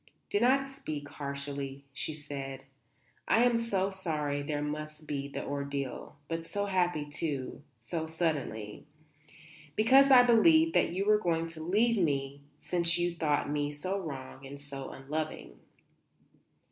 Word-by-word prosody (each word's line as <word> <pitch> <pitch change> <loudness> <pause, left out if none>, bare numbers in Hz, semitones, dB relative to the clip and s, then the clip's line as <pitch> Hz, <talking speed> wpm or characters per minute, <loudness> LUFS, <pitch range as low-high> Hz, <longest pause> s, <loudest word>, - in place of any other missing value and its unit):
"Do 205 - +3
not 265 +4 +4
speak 155 - -6
harshly," 140 -1 -5
she 150 +3 -3
said. 135 -3 -6 0.6
"I 230 - +5
am 245 -1 +4
so 200 -4 0
sorry 150 -6 -2
there 145 0 -2
must 155 +1 -5
be 140 -2 -3
the 140 - -5
ordeal. 140 -2 -4
But 165 0 -3
so 200 +4 -2
happy, 175 -6 +1
too 145 -3 -3 0.2
so 160 +8 -3
suddenly. 150 -10 -2 0.9
Because 265 +5 +6
I 255 -2 +9
believed 315 +8 +6
that - - +4
you 190 +3 -1
were 210 0 +5
going 165 -4 +1
to 165 -1 -9
leave 215 +8 +2
me 140 -5 0 0.2
since 170 -1 +1
you 175 0 0
thought 155 -3 +1
me 145 0 -1
so 185 +7 -2
wrong 135 -6 -7
and 140 +1 -8
so 140 -1 -7
unloving." 145 - -5
155 Hz, 145 wpm, -31 LUFS, 140-190 Hz, 0.9 s, I